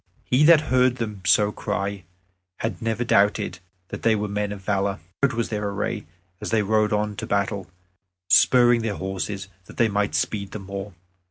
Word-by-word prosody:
He 130 +4 +3
that 165 -1 +7
heard 125 -1 +4
them 105 -5 -5
so 105 -1 +4
cry 100 -3 -3 0.6
had 115 +2 -3
never 115 +1 -1
doubted 105 -3 +2 0.3
that - - -6
they 115 -1 +3
were 105 0 -2
men 105 0 -2
of 100 -1 -7
valor. 100 0 0 0.2
Proud 140 -2 +3
was 115 -1 -2
their 105 -2 -2
array 100 -5 -3 0.3
as - - -4
they 110 -2 +2
rode 110 +1 +2
on 105 0 0
to - - -5
battle, 100 -1 -1 0.6
spurring 120 +1 +5
their 110 -3 -2
horses 95 +1 -4 0.2
that - - -14
they 115 -2 +3
might 100 -6 0
speed 100 +5 -2
the 105 - -5
more. 100 +1 -7
105 Hz, 180 wpm, -24 LUFS, 100-115 Hz, 0.6 s, that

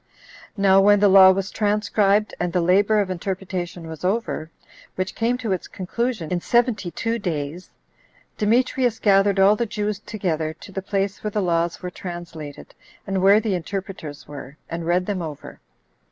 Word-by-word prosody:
Now 195 -1 +5
when 205 +1 +5
the 205 - +5
law 190 -1 +8
was 190 +1 0
transcribed, 210 0 +1
and 175 0 -1
the 180 - +2
labor 200 +5 +3
of 190 -2 -3
interpretation 185 -2 -4
was 160 0 -9
over, 190 -5 -1 0.5
which 185 0 -3
came 235 +2 0
to 235 -5 -3
its 185 - -2
conclusion 200 -2 -3
in 175 -1 0
seventy 235 -5 +1
two 230 +6 -2
days, 165 -2 -4 0.7
Demetrius 240 +2 +1
gathered 195 -1 +3
all 195 +2 +6
the 235 +2 -2
Jews 210 -1 -3
together 160 -8 -3
to 185 - -13
the 195 - -4
place 195 +1 -2
where 210 - -1
the 210 - -2
laws 170 -1 0
were 180 - -4
translated, 170 -5 -8 0.3
and 195 -1 -1
where 200 +2 +6
the 220 -2 -1
interpreters 180 -4 -6
were, 140 0 -10
and 165 0 -4
read 180 +1 +2
them 195 -2 -2
over. 155 -4 -8
195 Hz, 170 wpm, -22 LUFS, 175-210 Hz, 0.7 s, law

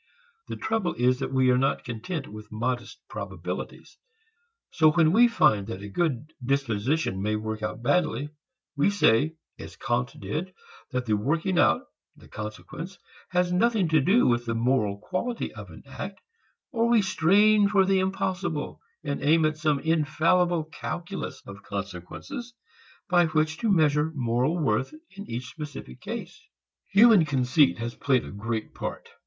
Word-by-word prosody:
The - - -5
trouble 220 -6 -1
is 125 +2 +2
that 135 - -3
we 130 -1 +3
are 125 - +3
not 135 +1 0
content 135 +6 -5
with 105 0 -11
modest 120 +2 -3
probabilities. - - -7 0.7
So 155 -1 +5
when 160 -2 +4
we 235 +6 +6
find 105 - +3
that 100 -3 -6
a 105 - -7
good 150 - -1
disposition 130 -3 0
may 105 +2 0
work 110 0 -4
out 110 +3 -4
badly, 145 +1 +1 0.5
we 145 +7 +3
say, 155 - +3 0.2
as - - -9
Kant 125 +3 -2
did, 180 +6 -4 0.3
that 125 -2 -2
the 110 -2 +2
working 160 - 0
out, - - +4 0.3
the - - -17
consequence, 125 - -7 0.3
has 180 0 +1
nothing 215 -1 +2
to 155 -2 +4
do 200 - +4
with 120 0 +1
the 115 - -1
moral 115 -4 +1
quality 190 - -3
of - - -10
an - - -13
act, - - -7 0.5
or 235 -2 +1
we 230 -3 +4
strain 200 +4 +4
for 195 -2 +4
the 195 0 +3
impossible, 185 -4 -2 0.2
and 140 - -3
aim 155 +3 +4
at 155 0 0
some 155 -2 +1
infallible 165 +2 +2
calculus 175 +4 -6
of 100 +1 -10
consequences 100 - -7 0.5
by 175 -1 +4
which 155 0 0
to 230 - 0
measure 155 -3 +3
moral 125 +5 0
worth 130 - 0 0.2
in 200 +1 -9
each 120 +2 -4
specific 145 - -8
case. - - -7 0.5
Human 210 -2 +7
conceit 135 0 +3
has 115 +1 -4
played 130 -2 +1
a - - -8
great 110 +2 -4
part. - - -6
150 Hz, 155 wpm, -26 LUFS, 120-180 Hz, 0.7 s, Human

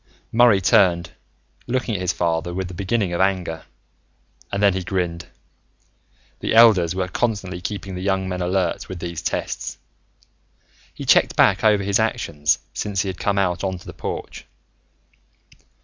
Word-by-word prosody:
Murray 115 -3 +5
turned, 85 -1 +3 0.6
looking 125 -1 -1
at 95 - -2
his 90 0 +1
father 85 0 -1
with 95 0 -3
the 90 - -9
beginning 100 0 -1
of 85 - 0
anger, 90 -4 -1 0.9
and 100 +1 -1
then 100 -2 +5
he 95 - -2
grinned. 90 -2 -3 1.1
The - - -1
elders 100 -7 +6
were 95 -1 -1
constantly 95 -3 -2
keeping 100 0 -5
the 90 - -5
young 95 -1 0
men 90 -1 -3
alert 90 -1 -1
with 95 - -6
these 85 -1 -5
tests. - - -3 1.1
He - - -8
checked - - +4
back 95 +2 +4
over 105 -2 +4
his 100 0 +1
actions 75 +1 0 0.2
since 100 -2 -2
he 100 - -3
had 95 - -6
come 100 -1 0
out 90 -2 0
onto 95 -2 -3
the - - -9
porch. - - -6
95 Hz, 155 wpm, -22 LUFS, 90-100 Hz, 1.1 s, elders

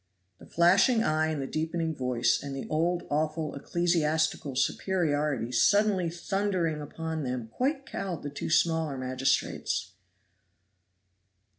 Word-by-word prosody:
The - - -14
flashing 195 +8 +4
eye 155 -2 +1
and 155 -2 -2
the 135 - -2
deepening 160 +2 -2
voice, 125 -3 +1
and 140 -1 -6
the 135 - -5
old 170 +3 0
awful 155 +1 -1
ecclesiastical 160 -3 0
superiority 145 -4 0
suddenly 195 - +3
thundering 175 -3 -1
upon 160 +2 -4
them 125 -4 -4
quite 270 - -1
cowed 195 - -5
the 145 - -5
two 140 - -5
smaller 160 -3 +2
magistrates. 130 +1 -1
160 Hz, 120 wpm, -28 LUFS, 140-175 Hz, -, flashing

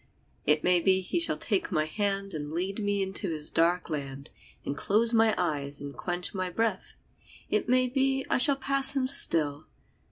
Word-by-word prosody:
It 150 +1 +2
may 180 0 +3
be 190 +2 +2
he 190 - -3
shall 335 - +2
take 370 - -2
my 155 -3 0
hand 195 +3 -3
And 150 -1 -6
lead 185 +5 -4
me 205 -1 -1
into 190 0 -4
his 155 -2 -3
dark 175 +2 0
land 140 -2 -7 0.3
And 140 - -4
close 225 +8 0
my 225 -1 +3
eyes 145 -5 -3
and 140 0 -9
quench 175 0 -4
my 185 -2 -3
breath 215 +1 -3 0.6
It - - -1
may 255 0 +3
be 270 +1 -1
I - - 0
shall 275 +2 +4
pass 275 0 +4
him 260 -2 0
still. 155 - +4
190 Hz, 185 wpm, -27 LUFS, 155-230 Hz, 0.6 s, shall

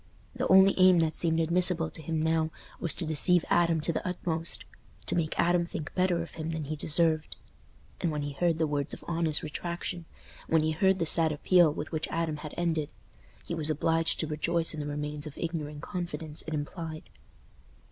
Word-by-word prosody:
The - - -2
only 190 +1 +7
aim 185 -1 +7
that 160 -1 0
seemed 165 -1 +1
admissible 170 0 +3
to - - -7
him 160 +1 -2
now 160 0 +1 0.3
was 165 -5 0
to 175 - -1
deceive 160 +3 +4
Adam 170 -2 +3
to 170 - 0
the - - -3
utmost: 170 -2 -3 0.4
to - - -2
make 160 -2 -1
Adam 175 0 +3
think 170 -3 -6
better 180 -2 +1
of 170 - -11
him 160 0 -5
than 160 -1 -3
he 155 +2 -4
deserved. 155 +1 0 0.6
And 170 - 0
when 150 -1 -3
he 145 - -4
heard 165 +3 0
the 160 - +1
words 145 -1 -1
of - - -16
honest 165 -2 +1
retractation—when 170 0 -4
he 155 - +1
heard 190 +4 +2
the 165 - 0
sad 160 0 +3
appeal 170 +2 +4
with 150 +1 -6
which 155 -1 -2
Adam 165 -2 -2 0.2
ended—he 160 - -5
was 160 -2 0
obliged 165 +2 +1
to - - -1
rejoice 165 +2 0
in 155 - -6
the 145 - -4
remains 150 +1 -4
of 150 - -10
ignorant 150 -3 -4
confidence 170 -4 -4
it 160 - -4
implied. 155 +1 -6
160 Hz, 190 wpm, -29 LUFS, 155-170 Hz, 0.6 s, only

